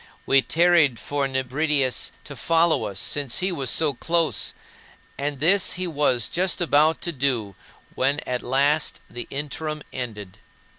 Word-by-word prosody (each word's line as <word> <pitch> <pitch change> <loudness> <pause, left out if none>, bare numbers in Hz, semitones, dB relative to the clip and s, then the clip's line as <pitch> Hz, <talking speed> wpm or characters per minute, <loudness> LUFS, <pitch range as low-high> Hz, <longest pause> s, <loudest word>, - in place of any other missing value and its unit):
We 135 0 +5
tarried 165 -1 +3
for 145 -1 -2
Nebridius 135 +1 0
to 145 - -10
follow 165 +5 +2
us, 100 -2 -6
since 140 0 0
he 185 0 0
was 140 -7 -2
so 155 -3 +1
close, 165 +4 0 0.6
and 140 -1 -3
this 180 +6 +3
he 185 0 -3
was 145 -8 +1
just 180 0 0
about 155 -1 +3
to 170 - -2
do 125 -8 0 0.4
when 140 +3 +1
at 125 -1 -3
last 140 +4 +1
the 120 - -7
interim 150 +2 -4
ended. 105 -7 -6
145 Hz, 145 wpm, -24 LUFS, 130-160 Hz, 0.6 s, We